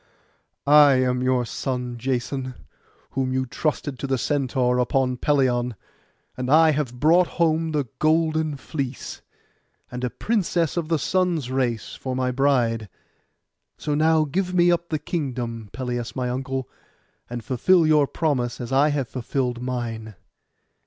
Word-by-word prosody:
'I 145 0 +7
am 125 -1 +1
your 130 0 +2
own - - -3
son 125 0 -3
Jason, 130 +1 -2 0.6
whom 130 -1 -1
you 130 0 0
trusted 145 0 -2
to 140 - -3
the 135 -1 +1
Centaur 125 -2 0
upon 130 +1 +1
Pelion; 125 -3 +1 0.6
and 125 0 -4
I 160 +2 +6
have 135 -5 -2
brought 170 +5 +5
home 165 -1 +2
the 145 -4 -1
golden 155 -1 +1
fleece, 135 -2 -5 0.7
and 125 0 -5
a 125 - 0
princess 180 - 0
of 170 -3 -1
the 165 0 +1
Sun's 170 -4 0
race 125 -4 -1
for 130 -1 -4
my 130 0 0
bride. 125 -5 +1 0.9
So 150 - -2
now 155 +1 +3
give 180 +5 -2
me 175 0 +5
up 170 0 -1
the 155 - 0
kingdom, 125 - -4
Pelias 120 -2 -4
my 125 -1 -1
uncle, 130 0 -3 0.6
and 120 -1 -5
fulfil 160 - +3
your 150 -2 +4
promise 135 -8 -1
as 120 0 -6
I 135 +3 +4
have 140 -4 -1
fulfilled 125 0 -2
mine. 115 -4 -4
135 Hz, 145 wpm, -24 LUFS, 125-155 Hz, 0.9 s, I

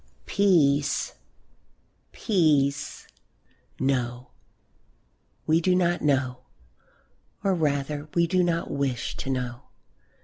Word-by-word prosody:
Peace! 150 -8 +2 1.0
peace! 150 - +1 0.7
No, 125 -2 -1 1.1
we 160 +2 +3
do 180 +1 +2
not 175 -1 +1
know! 130 -4 +1 1.0
Or 195 -1 +2
rather, 150 -2 -1
we 170 -1 +4
do 185 +2 +2
not 170 -1 -1
wish 135 -4 -2
to 135 - -5
know. 125 -2 -3
145 Hz, 90 wpm, -26 LUFS, 135-170 Hz, 1.1 s, we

